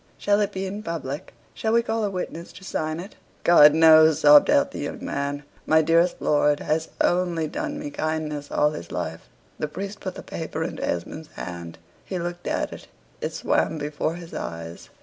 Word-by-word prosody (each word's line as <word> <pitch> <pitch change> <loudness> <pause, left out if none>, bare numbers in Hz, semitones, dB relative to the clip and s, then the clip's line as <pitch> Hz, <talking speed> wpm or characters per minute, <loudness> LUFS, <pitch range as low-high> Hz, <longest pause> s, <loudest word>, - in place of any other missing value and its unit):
Shall 205 0 +2
it 205 - 0
be 190 0 -3
in 200 +2 -5
public? 155 -7 -5 0.2
Shall 220 0 -1
we 235 0 +4
call 225 -1 -1
a 205 - +1
witness 180 -3 -5
to 185 - -13
sign 155 -3 -3
it?" 190 +4 -9 0.3
"God 150 -3 +7
knows," 160 -1 +7
sobbed 145 0 +8
out - - +3
the - - -7
young - - -5
man, 140 +1 -3 0.2
"my 160 0 +5
dearest 165 +3 +3
lord 145 0 +2
has 160 +1 -1
only 175 -2 +1
done 300 - -4
me 290 0 -5
kindness 155 - -3
all 150 0 +2
his 85 - -8
life." - - -5 0.3
The 150 - -1
priest 200 +6 -6
put 185 -1 -5
the - - -8
paper 160 -1 -4
into 165 - -5
Esmond's 150 - -4
hand. 85 -1 -7 0.3
He 185 - -4
looked 175 0 -5
at - - -1
it. - - -11 0.3
It - - -2
swam - - 0
before 150 +2 -2
his 170 -1 -10
eyes. 85 0 -7
160 Hz, 190 wpm, -24 LUFS, 150-185 Hz, 0.3 s, sobbed